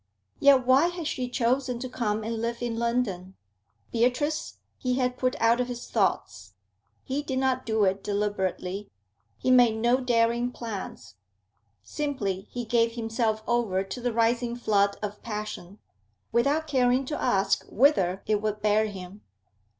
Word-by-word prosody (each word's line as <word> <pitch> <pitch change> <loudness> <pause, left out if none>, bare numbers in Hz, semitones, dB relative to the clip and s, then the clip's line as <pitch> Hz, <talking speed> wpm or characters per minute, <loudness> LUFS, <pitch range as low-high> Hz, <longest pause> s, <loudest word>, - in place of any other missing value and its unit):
Yet 275 -3 +5
why 265 +6 +5
had 350 -2 -5
she 255 -4 -2
chosen 250 +1 0
to 255 +2 -5
come 220 -4 -2
and 225 0 -3
live 235 +1 -3
in 230 -1 -2
London? 215 -6 -1 0.6
Beatrice 255 +6 0 0.2
he 250 -1 0
had 250 -1 0
put 255 0 0
out 230 +2 +3
of 250 - -2
his 245 -1 -6
thoughts. 105 - -1 0.5
He 270 +2 -2
did 270 -3 -3
not 260 -1 0
do 220 -1 +2
it 195 0 +1
deliberately; 200 -1 -2 0.5
he 255 - 0
made 245 -3 +6
no 240 +3 +2
daring 240 -1 +1
plans; 210 - -7 0.7
simply 205 - -3
he 245 -1 -5
gave 230 0 +2
himself 225 -1 -1
over 225 -6 +1
to 195 +6 -7
the 245 0 0
rising 235 +1 +1
flood 200 -4 +1
of 205 0 -5
passion, 210 -4 -6 0.5
without 280 +7 +2
caring 260 -2 +2
to 300 +3 -4
ask 195 -5 +2
whither 195 -8 +3
it 210 -1 +1
would 210 -1 -3
bear 215 +1 +3
him. 195 0 -9
235 Hz, 150 wpm, -27 LUFS, 210-250 Hz, 0.7 s, made